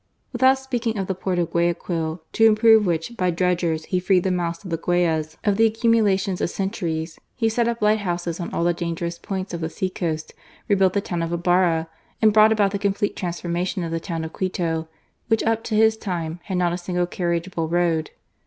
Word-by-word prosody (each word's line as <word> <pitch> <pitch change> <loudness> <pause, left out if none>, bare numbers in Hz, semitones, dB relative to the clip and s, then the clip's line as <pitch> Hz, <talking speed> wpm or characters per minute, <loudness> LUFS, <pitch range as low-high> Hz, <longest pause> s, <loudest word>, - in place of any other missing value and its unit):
Without 260 +2 +4
speaking 245 -4 -2
of 195 - -1
the 190 - -2
port 185 0 -2
of 170 -1 0
Guayaquil, 170 -1 -1
to 225 - +4
improve 220 -1 +5
which, 170 +7 -2
by 185 -4 +1
dredgers, 170 -2 0
he 185 - 0
freed 180 0 +2
the 190 - +1
mouths 170 -1 -2
of 180 - -8
the 165 - 0
Guayas 160 -2 0
of 205 -2 +2
the 225 0 +5
accumulations 215 -4 +1
of - - 0
centuries, 170 -5 -3 0.2
he 230 -3 +1
set 230 +1 +1
up 235 -2 -2
lighthouses 175 -5 0
on 175 - -4
all - - -1
the 175 0 +3
dangerous 170 0 -4
points 190 -1 -5
of 170 - -4
the 160 - -2
sea 185 +3 -3
coast, 160 -4 -3 0.3
rebuilt 190 -3 +3
the 200 - +1
town 175 -3 -3
of 165 0 -2
Ibarra, 170 -1 +2 0.3
and 220 -3 +4
brought 215 +1 +6
about 205 -3 +3
the 200 - -2
complete 200 0 0
transformation 175 +1 -3
of 165 - -4
the 165 - -1
town 165 -1 -4
of 160 - -6
Quito, 165 -4 -2 0.4
which 225 -1 +2
up 225 0 0
to 220 - -2
his 220 +1 +4
time 170 -5 -4
had 190 - -2
not 175 -1 +1
a 175 - -3
single 180 0 -1
carriageable 170 -1 -2
road. 170 -2 +1
180 Hz, 210 wpm, -23 LUFS, 170-205 Hz, 0.4 s, brought